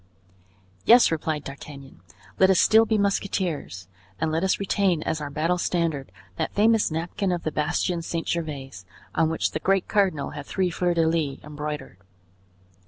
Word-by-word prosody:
"Yes," 240 -4 +6
replied 155 -2 -2
D'Artagnan, 140 - -10 0.4
"let 190 - +6
us 190 - +4
still 220 +1 +6
be 220 - +2
musketeers, 185 - -2 0.3
and 160 - 0
let 160 +3 0
us 190 - +1
retain 195 -4 +1
as 160 -1 -2
our 145 - -4
battle 165 +5 0
standard 165 -6 -1 0.3
that - - -3
famous 220 +1 +4
napkin 170 +4 -2
of 175 -1 -2
the 155 - -2
bastion 170 +4 -1
St. 165 0 -4
Gervais, 150 -5 -3 0.4
on 160 0 +2
which 160 - -1
the - - -3
great 195 +2 +1
cardinal 185 -9 +1
had 145 -1 -8
three 185 -2 0
fleurs 175 +1 0
de 165 -1 +3
lis 155 -4 0
embroidered." 150 -7 -6
165 Hz, 165 wpm, -25 LUFS, 150-190 Hz, 0.4 s, Yes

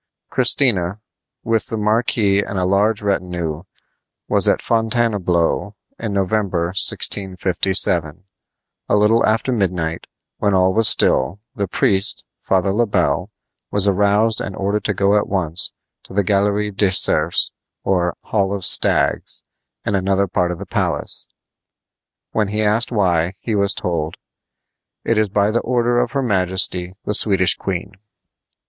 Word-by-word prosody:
Christina, 110 -7 +2 0.4
with 115 -1 0
the 110 - -4
marquis 105 -2 +1
and 100 - -5
a 90 - 0
large 105 +3 +1
retinue, 90 -5 -2 0.7
was - - +2
at - - +3
Fontainebleau 105 -5 0 0.2
in 110 -2 -4
November, 95 -3 -1
1657. 90 -3 +1 0.7
A - - +3
little 105 +2 +3
after 110 +4 +1
midnight, 90 -7 -2 0.3
when 100 -2 +1
all 95 0 +3
was 110 +1 +4
still, 95 - +2
the 100 -5 -3
priest, 95 +3 +1
Father 95 0 0
Le 115 +3 +1
Bel, 90 -2 0 0.4
was 100 0 +3
aroused 105 +3 +2
and 95 - -5
ordered 100 +2 -2
to 105 - -1
go 100 +2 +2
at 105 - +1
once 90 -4 -2 0.3
to - - -12
the 100 - +2
Galerie 105 +2 0
des 100 0 +1
Cerfs, 80 -3 +2 0.3
or 90 -2 0
Hall 100 -2 -1
of 100 -3 -3
Stags, - - +1 0.4
in - - -1
another 100 0 +1
part 90 -1 -1
of 90 - -4
the - - -8
palace. - - -3 1.0
When 110 -2 0
he 105 +2 -2
asked 110 +4 +2
why, 90 -5 +1
he 115 - -4
was 100 0 +3
told: 85 -4 -3 0.9
"It 115 -2 +1
is 110 -1 +1
by 100 +1 +1
the 120 - 0
order 120 0 +1
of 120 +1 -1
her 140 -1 0
majesty 90 -3 0
the 105 - -1
Swedish 95 -3 +4
queen." 90 -3 -4
100 Hz, 140 wpm, -19 LUFS, 90-105 Hz, 1.0 s, was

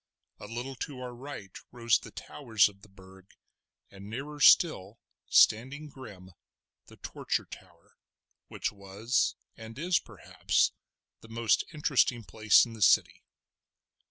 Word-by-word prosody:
A 105 - -10
little 120 +4 -6
to 135 0 -6
our 125 -1 -7
right 120 -6 -10 0.2
rose 115 -2 +1
the - - -12
towers 115 -8 0
of 100 -1 -14
the 105 - -18
Burg, 95 0 -18 0.6
and 100 +1 -12
nearer 140 +6 -7
still, 115 - +4 0.3
standing 135 +7 +3
grim, 100 -9 -12 0.6
the - - -16
Torture - - -4
Tower, - - -16 0.5
which - - -4
was, 100 +5 -2 0.2
and 110 +1 -11
is, 175 +3 +1
perhaps, - - -1 0.5
the 115 - -16
most 115 -1 +1
interesting 140 -6 +1
place 110 +1 +4
in 115 - -10
the 110 - -11
city. - - +3
115 Hz, 130 wpm, -29 LUFS, 100-130 Hz, 0.6 s, still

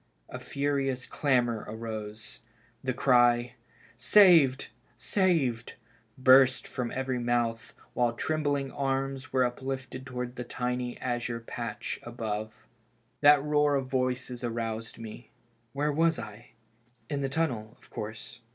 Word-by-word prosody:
A - - -7
furious 140 -2 -1
clamor 120 -6 +1
arose. 110 0 -6 0.4
The 130 - 0
cry, 120 -1 +3 0.4
Saved! 155 - +5 0.3
saved!" 135 - 0 0.4
burst 130 0 +6
from 125 -2 -3
every 130 0 -2
mouth, 120 -1 -1 0.2
while 120 -1 +1
trembling 145 0 -1
arms 135 0 -2
were 130 -1 +3
uplifted 130 +1 -5
towards 125 -1 -4
the 125 - -5
tiny 125 0 -3
azure 120 -1 -2
patch 115 0 -5
above. 110 -2 -5 0.5
That 145 -1 +6
roar 150 -1 +2
of 135 -2 -2
voices 125 -1 -1
aroused 115 -1 -3
me. 115 +1 -10 0.4
Where 145 +3 0
was 165 +2 +2
I? 110 +2 -9 0.5
In 145 -2 -2
the 135 - -1
tunnel, 125 -8 -2
of - - -22
course. 110 +2 -7
125 Hz, 120 wpm, -29 LUFS, 120-135 Hz, 0.5 s, burst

